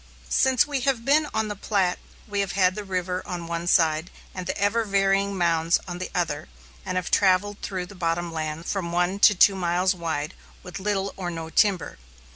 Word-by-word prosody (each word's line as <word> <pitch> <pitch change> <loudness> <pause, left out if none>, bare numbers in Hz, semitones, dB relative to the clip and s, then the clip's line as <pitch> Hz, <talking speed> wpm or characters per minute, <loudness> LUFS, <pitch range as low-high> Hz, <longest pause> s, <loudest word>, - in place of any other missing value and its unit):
Since 260 - +3
we 290 -2 -2
have 255 -3 0
been 300 +2 +3
on 220 0 -1
the 210 - -4
Platte, 195 -3 0 0.3
we 205 -1 -2
have 195 -3 -1
had 185 -2 +3
the 210 - -5
river 185 -1 -2
on 175 -2 -5
one 170 +1 -4
side 160 -1 +3 0.2
and 185 -1 -6
the 190 - -2
ever 205 +3 +1
varying 195 -1 +1
mounds 170 -1 +2
on 175 0 -5
the 185 - -4
other, 160 -3 -2 0.3
and 185 - -4
have 185 -1 -2
travelled 200 +1 +2
through 185 -2 -4
the 205 - -13
bottom 170 -1 -2
lands 155 +1 -4
from 180 -4 -3
one 180 +3 0
to 210 0 +6
two 195 +2 +5
miles 180 +1 +1
wide, 165 -3 -3 0.3
with 180 +1 -7
little 195 0 -1
or 180 -2 -3
no 165 -1 -6
timber. 190 - +1
185 Hz, 200 wpm, -25 LUFS, 170-200 Hz, 0.3 s, to